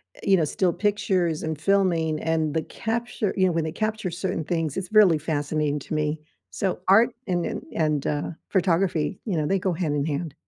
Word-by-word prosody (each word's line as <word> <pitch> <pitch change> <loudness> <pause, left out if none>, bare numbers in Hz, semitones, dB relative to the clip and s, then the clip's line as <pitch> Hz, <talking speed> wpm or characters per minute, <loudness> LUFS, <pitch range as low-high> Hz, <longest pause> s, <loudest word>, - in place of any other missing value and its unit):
eh, - - -18
you 195 -1 +4
know, 165 - +2
still 180 +3 0
pictures, 185 -6 0
and 160 -2 -3
filming, 170 -4 +2
and 160 -1 +1
when 150 - -3
the 160 -1 0
capture 230 -2 -2
you 190 - +4
know, 180 - +3
when 165 -1 0
they 160 - -3
capture 215 0 -2
certain 175 -2 -2
things, 165 -3 -2
it's 190 0 -4
really 200 -7 +6
fascinating 150 -1 -1
to 150 - -7
me. 150 0 0 0.3
So 190 -2 -2
art 225 +6 +6 0.2
and 175 -2 0
and - - -4
and, 150 -3 0
uh, 145 0 -1 0.2
photography, 180 -3 +1
you 195 -8 -1
know, 150 - 0
they 195 +4 +1
go 185 - 0
hand 160 -4 -1
in 145 - 0
hand. 155 0 -3
170 Hz, 210 wpm, -25 LUFS, 155-190 Hz, 0.3 s, really